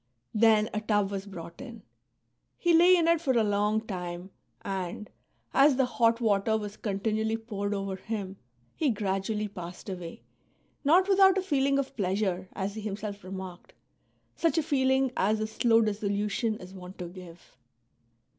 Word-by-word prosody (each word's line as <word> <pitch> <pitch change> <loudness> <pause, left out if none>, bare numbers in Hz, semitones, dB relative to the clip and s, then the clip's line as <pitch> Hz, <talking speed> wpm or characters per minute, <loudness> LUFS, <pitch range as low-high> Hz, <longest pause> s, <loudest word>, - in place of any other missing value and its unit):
'' 120 - -49
Then 215 -1 +4
a 215 - -1
tub 205 -2 +1
was 195 0 -4
brought 170 +1 -9
in; 235 -6 -10 0.7
he 345 -1 +2
lay 350 +3 +7
in 335 -2 +2
it 335 -1 +3
for 270 -5 +1
a 230 -2 +3
long 210 +1 +1
time, 180 -3 -6 0.3
and, 190 +1 -4 0.4
as 275 0 +5
the 265 0 +3
hot 230 -2 +2
water 220 -1 +2
was 210 -1 -6
continually 220 +2 -1
poured 205 -3 -3
over 195 -1 -3
him, 195 -2 -5 0.4
he 305 - +1
gradually 210 0 -1
passed 180 -1 -9
away, 180 -3 -7 0.6
not 350 +7 +5
without 390 -1 +5
a 380 - 0
feeling 275 -5 +2
of 275 0 -2
pleasure, 190 -2 -1
as 195 +1 -3
he 220 - -6
himself 205 -1 -5
remarked, 185 -1 -8 0.4
— - - -42 0.2
such 335 0 +1
a 320 - +3
feeling 265 -3 +2
as 215 +3 +1
a 215 - 0
slow 225 +1 +3
dissolution 210 +1 -1
is 185 -1 -11
wont 185 0 -10
to 180 - -5
give. 175 -1 -13
210 Hz, 165 wpm, -28 LUFS, 195-245 Hz, 0.7 s, lay